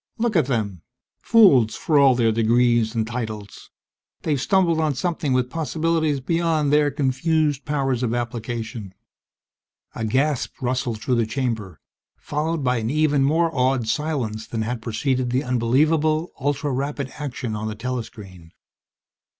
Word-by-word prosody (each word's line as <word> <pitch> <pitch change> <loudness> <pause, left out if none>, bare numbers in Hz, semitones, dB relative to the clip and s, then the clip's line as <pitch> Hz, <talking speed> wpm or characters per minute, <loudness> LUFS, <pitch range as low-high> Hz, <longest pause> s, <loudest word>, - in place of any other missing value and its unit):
_Look 230 -2 0
at 160 -7 +3
them 105 - -2 0.4
fools 135 - +5
for 150 -3 +2
all 135 -2 +6
their 115 -2 +2
degrees 115 0 +2
and 110 -1 0
titles! 110 -3 -6 0.5
They've 145 -5 0
stumbled 175 -3 +2
on 155 -3 +1
something 160 -2 -2
with 125 -1 +1
possibilities 160 -2 0
beyond 160 0 0
their 150 0 +4
confused 145 +1 0
powers 135 -5 -1
of 120 -3 0
application._ 115 -3 -4 1.0
A 115 - -5
gasp 135 +3 0
rustled 125 -3 -2
through 125 -2 +1
the 115 -2 +1
chamber, 110 -6 -3 0.4
followed 155 +1 -2
by 125 -1 +1
an 110 0 -2
even 150 0 +2
more 165 +4 +2
awed 130 -2 +1
silence 115 -7 -2
than 110 -1 -3
had 120 +1 -3
preceded 125 +2 -1
the 130 +3 0
unbelievable, 150 +6 +1
ultra 145 +1 -1
rapid 140 +1 -3
action 130 -6 -4
on 105 +1 -4
the 110 - -4
telescreen. 105 -8 -7
130 Hz, 140 wpm, -22 LUFS, 115-150 Hz, 1.0 s, all